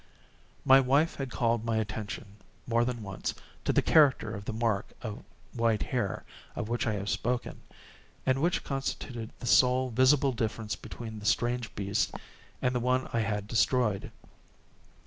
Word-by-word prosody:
My 135 -1 +8
wife 140 +5 +2
had 135 -2 -3
called 115 -2 +1
my 115 -1 0
attention, 105 -1 -4 0.3
more 115 0 +2
than 120 -2 -3
once, 95 -1 -4 0.3
to - - +3
the - - +3
character 140 -8 +4
of 100 -1 -7
the - - -2
mark 110 -3 -1
of 110 -3 -6 0.3
white 115 -3 +1
hair, 120 -7 -2 0.3
of 105 - -4
which 120 0 -1
I 110 - +1
have 100 -1 -4
spoken, 120 +3 -2 0.6
and 130 +1 +2
which 175 +3 +1
constituted 130 -4 -4
the - - -7
sole 125 +1 +4
visible 135 +3 +4
difference 110 -3 -2
between 110 -2 -8
the 105 - -10
strange 120 -1 0
beast 100 0 -1 0.5
and 125 - +2
the 125 - +1
one 125 +2 +1
I 115 - +2
had 105 -2 -1
destroyed. 115 -3 +1
115 Hz, 160 wpm, -29 LUFS, 110-130 Hz, 0.6 s, My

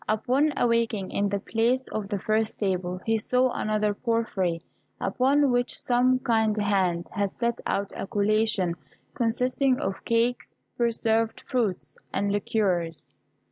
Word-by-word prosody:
Upon 255 +8 +2
awaking, 230 -5 +1
in 200 0 0
the 200 0 -1
place 235 +5 0
of 210 -2 -3
the 205 - -1
first 215 +2 0
table 185 -2 -1
he 225 0 +2
saw 250 +3 +2
another 215 -1 0
of 205 - -10
porphyry, 195 -8 0 0.4
upon 265 +7 +2
which 245 0 0
some 250 +1 +3
kind 220 -3 +1
hand 190 -4 +1
had 200 -1 -1
set 235 0 -2
out 200 0 -1
a - - -5
collation 210 -3 +1 0.4
consisting 250 +3 +1
of 190 0 -3
cakes, 235 +1 0 0.2
preserved 225 -1 0
fruits, 220 -8 -2
and 200 +1 0
liqueurs. 185 -7 -1
220 Hz, 140 wpm, -26 LUFS, 200-240 Hz, 0.4 s, some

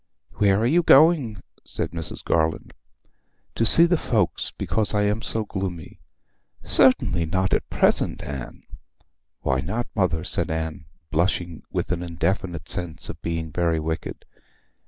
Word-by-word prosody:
'Where 100 -1 +3
are 115 - +1
you 160 +8 +4
going?' 140 - +4 0.2
said - - -4
Mrs. 80 -1 -6
Garland. 80 -1 0 0.8
'To 115 - 0
see 165 +8 +7
the 170 -1 +2
folks, - - 0
because 110 -1 -2
I 105 - +2
am 105 +2 0
so 110 -1 -2
gloomy!' 95 -5 -5 0.6
'Certainly 90 -10 +3
not 95 +2 0
at - - -1
present, - - +1
Anne.' 70 -3 -7 0.8
'Why 65 -1 0
not, 115 - -3
mother?' 90 -5 0
said 85 -2 -1
Anne, 80 0 -4 0.3
blushing 85 0 -1
with - - -2
an 90 -1 -1
indefinite 85 0 -2
sense 85 -6 -4
of - - -8
being 80 -1 -3
very 85 0 0
wicked. 80 +1 -5
90 Hz, 140 wpm, -24 LUFS, 80-105 Hz, 0.8 s, see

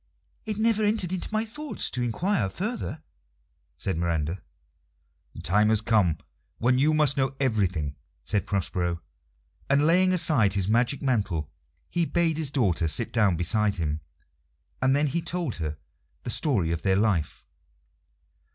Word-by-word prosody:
"It 215 -2 -2
never 220 0 +2
entered 205 -4 0
into 185 - -3
my 215 +1 0
thoughts 300 +6 -2
to 125 - -2
inquire 120 - 0
further," 190 - -4 0.7
said 95 -4 -2
Miranda. 85 +1 -1 0.9
"The - - -9
time 105 +4 +3
has 110 -1 +3
come 105 -8 +2 0.4
when 125 +2 +2
you 155 +3 +3
must 150 -3 +3
know 135 0 0
everything," 95 - 0 0.3
said 105 0 -1
Prospero; 90 -3 -1 0.7
and 140 +1 +4
laying 185 +3 +4
aside 140 - +3
his 95 -2 0
magic 120 +6 +1
mantle, 100 - -1 0.4
he 170 -1 +1
bade 165 -2 +1
his 155 -3 0
daughter 95 - +1
sit 115 +9 0
down 105 -6 +3
beside 100 +4 +1
him, 80 -3 -2 0.8
and 130 +1 +3
then 145 +1 +2
he 150 +4 -1
told 175 0 -3
her 75 -2 -4 0.5
the 120 - -3
story 110 - +1
of 85 -1 -2
their 95 -1 +2
life. 95 -9 0
115 Hz, 150 wpm, -26 LUFS, -, 0.9 s, and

